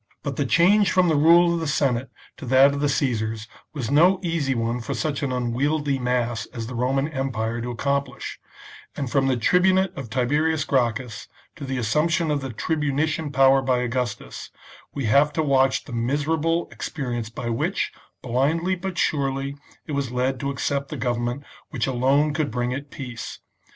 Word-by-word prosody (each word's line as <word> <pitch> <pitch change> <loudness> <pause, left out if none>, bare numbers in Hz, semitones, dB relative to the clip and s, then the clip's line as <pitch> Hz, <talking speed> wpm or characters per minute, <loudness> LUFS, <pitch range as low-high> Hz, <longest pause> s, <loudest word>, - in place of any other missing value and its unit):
But 140 -3 -3
the 140 -1 -1
change 195 - +4
from 185 -2 +3
the 160 - +2
rule 170 +3 +5
of 170 - -1
the 160 - -3
Senate 135 -4 0 0.3
to 140 - -8
that 135 +3 +6
of 140 - -3
the 145 0 +1
Caesars 110 -5 -1 0.2
was 135 -6 -4
no 180 +6 +5
easy 160 -6 0
one 115 +1 -1
for - - -4
such 155 -2 -2
an 140 -3 -1
unwieldy 135 +4 0
mass 120 -2 -1
as 115 -2 -6
the 125 - -7
Roman 130 +4 0
empire 120 -5 -2
to 120 - -4
accomplish, 140 +2 -3 0.6
and 135 -4 -3
from 135 -2 +2
the 130 -2 +1
tribunate 185 +8 +3
of 135 -4 -7
Tiberius 145 +6 +1
Gracchus 120 -3 -1 0.3
to 145 - -7
the 135 -1 -3
assumption 155 +8 +1
of 145 -1 0
the 135 - -5
tribunician 150 +3 -1
power 135 0 +5
by 130 -1 +1
Augustus, 125 -2 -3 0.4
we 140 - -3
have 140 +7 +4
to 160 - 0
watch 135 -2 +2
the 130 - -10
miserable 150 +7 0
ex - - -5
perience 120 -6 -4
by 120 +1 -5
which, 150 - -1 0.3
blindly 150 +9 +1
but 185 0 -4
surely, 135 -1 0 0.3
it - - -7
was 140 -3 -1
led 125 +1 -1
to 140 - -2
accept 140 0 -2
the 150 - -5
government 120 +2 -2 0.3
which 125 -6 -1
alone 135 +4 +2
could 150 -1 -1
bring 125 +1 -2
it 140 +2 -5
peace. 120 -5 -7
135 Hz, 180 wpm, -24 LUFS, 125-150 Hz, 0.6 s, that